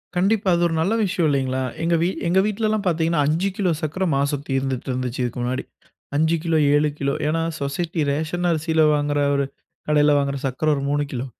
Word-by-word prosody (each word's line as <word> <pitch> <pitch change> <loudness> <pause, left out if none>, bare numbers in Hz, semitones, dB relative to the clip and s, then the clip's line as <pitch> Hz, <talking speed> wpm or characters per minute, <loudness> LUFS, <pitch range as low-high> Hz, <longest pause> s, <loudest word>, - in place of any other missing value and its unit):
கண்டிப்பா, 195 +2 +2
அது 170 - 0
ஒரு 165 - -3
நல்ல 195 +7 +1
விஷயம் 175 -3 0
இல்லைங்களா? 130 -2 0 0.2
எங்க 170 +1 +2
வீ 170 - +2 0.2
எங்க 180 +3 +3
வீட்லலாம் 215 0 0
பார்த்தீங்கன்னா, 165 -2 +1
5 170 +6 +1
கிலோ 195 -5 +1
சர்க்கரை 175 +5 -2
மாசம் 140 0 -1
தீர்ந்துட்டுருந்துச்சு 130 -1 -2
இதுக்கு 120 +1 -3
முன்னாடி. 125 +1 -2 0.5
5 160 +3 +2
கிலோ, 165 -1 +1 0.2
7 150 +1 +3
கிலோ, 140 0 0
ஏன்னா? 165 +2 0 0.2
சொசைட்டி 160 +4 -2
ரேஷன் 160 +4 -1
அரிசில 160 0 +1
வாங்குற 145 0 0 0.2
ஒரு 140 0 +1 0.4
கடையில 150 -1 +4
வாங்குற 140 0 0
சர்க்கரை 135 +4 -1
ஒரு 140 - -3
3 145 0 +1
கிலோ, 125 0 -3
155 Hz, 180 wpm, -22 LUFS, 140-170 Hz, 0.5 s, கடையில